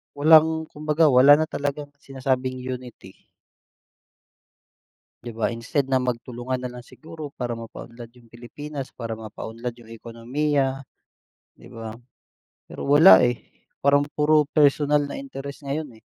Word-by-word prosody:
walang 160 Hz, +2 st, +5 dB
kumbaga 150 Hz, 0 st, +2 dB
wala 135 Hz, +3 st, +7 dB
na 155 Hz, -, +1 dB
talagang 145 Hz, -1 st, -4 dB
sinasabing 130 Hz, -1 st, -2 dB
unity. 125 Hz, -6 st, -9 dB, 2.0 s
'Di 120 Hz, -, -6 dB
ba 110 Hz, -, +1 dB
instead 120 Hz, +5 st, -2 dB
na 130 Hz, -, +3 dB
magtulungan 125 Hz, 0 st, -3 dB
na 125 Hz, -, -4 dB
lang 125 Hz, 0 st, -10 dB
siguro 155 Hz, -2 st, -10 dB
para 120 Hz, -2 st, -4 dB
mapaunlad 115 Hz, +1 st, -10 dB
yung 120 Hz, -2 st, -21 dB
Pilipinas, 135 Hz, +4 st, -8 dB
para 115 Hz, -2 st, -6 dB
mapaunlad 115 Hz, +2 st, -7 dB
yung 115 Hz, -2 st, -17 dB
ekonomiya, 130 Hz, +4 st, -2 dB, 0.7 s
'di -, -, -17 dB
ba? 115 Hz, -1 st, -8 dB, 0.8 s
Pero -, -, -6 dB
wala, 150 Hz, +6 st, +8 dB
eh, 120 Hz, -1 st, -3 dB, 0.2 s
parang 145 Hz, +1 st, +3 dB
puro 150 Hz, -1 st, +3 dB
personal 150 Hz, 0 st, +3 dB
na 145 Hz, -, -6 dB
interes 140 Hz, -, -8 dB
ngayon, 145 Hz, 0 st, -5 dB
eh. -, -, -34 dB
135 Hz, 130 wpm, -23 LUFS, 120-150 Hz, 2.0 s, wala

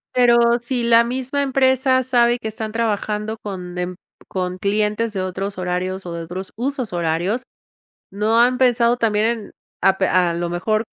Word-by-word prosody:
Pero 245 Hz, -1 st, +5 dB, 0.2 s
si 240 Hz, 0 st, -2 dB
la 235 Hz, 0 st, +5 dB
misma 260 Hz, +3 st, -2 dB
empresa 260 Hz, -1 st, +2 dB
sabe 240 Hz, -1 st, +3 dB
que 220 Hz, -, -6 dB
están 220 Hz, 0 st, -5 dB
trabajando 215 Hz, -1 st, -2 dB
con 180 Hz, -3 st, -6 dB
em 180 Hz, 0 st, -3 dB, 0.3 s
con 180 Hz, -1 st, -3 dB
clientes 210 Hz, +2 st, 0 dB
de 195 Hz, -, -3 dB
otros 195 Hz, +2 st, -4 dB
horarios 185 Hz, +1 st, -3 dB
o 175 Hz, -, -5 dB
de 170 Hz, 0 st, -5 dB
otros 185 Hz, +3 st, -7 dB
husos 255 Hz, -3 st, -3 dB
horarios, 175 Hz, +8 st, -1 dB, 0.7 s
¿no 215 Hz, +3 st, +1 dB
han 250 Hz, +1 st, +4 dB
pensado 240 Hz, -2 st, +3 dB
también 220 Hz, -3 st, +1 dB
en 230 Hz, -3 st, -2 dB, 0.3 s
a 190 Hz, 0 st, +4 dB
pe 190 Hz, -, +2 dB
a 180 Hz, -2 st, +2 dB
lo 170 Hz, 0 st, -2 dB
mejor 215 Hz, +6 st, 0 dB
215 Hz, 170 wpm, -20 LUFS, 185-240 Hz, 0.7 s, Pero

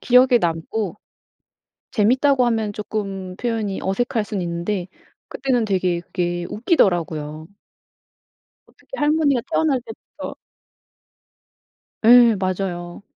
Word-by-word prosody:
기억에 250 Hz, 0 st, +5 dB
남고 175 Hz, +4 st, -2 dB, 1.0 s
재밌다고 255 Hz, +4 st, +3 dB
하면 220 Hz, -3 st, 0 dB
쪼끔 195 Hz, -3 st, -5 dB
표현이 225 Hz, -5 st, -2 dB
어색할 225 Hz, +3 st, -1 dB
순 205 Hz, -2 st, -4 dB
있는데 175 Hz, +2 st, -3 dB, 0.4 s
그때는 250 Hz, -4 st, 0 dB
되게 185 Hz, -4 st, 0 dB
그게 175 Hz, -1 st, -3 dB
웃기더라고요. 165 Hz, -, 0 dB, 1.2 s
어떻게 -, -, -27 dB
할머니가 295 Hz, -3 st, +2 dB
태어날 295 Hz, -5 st, +2 dB
때부터 225 Hz, -3 st, -9 dB, 1.7 s
예 235 Hz, -1 st, +7 dB
맞아요. 185 Hz, -1 st, -3 dB
210 Hz, 240 characters per minute, -21 LUFS, 175-245 Hz, 1.7 s, 예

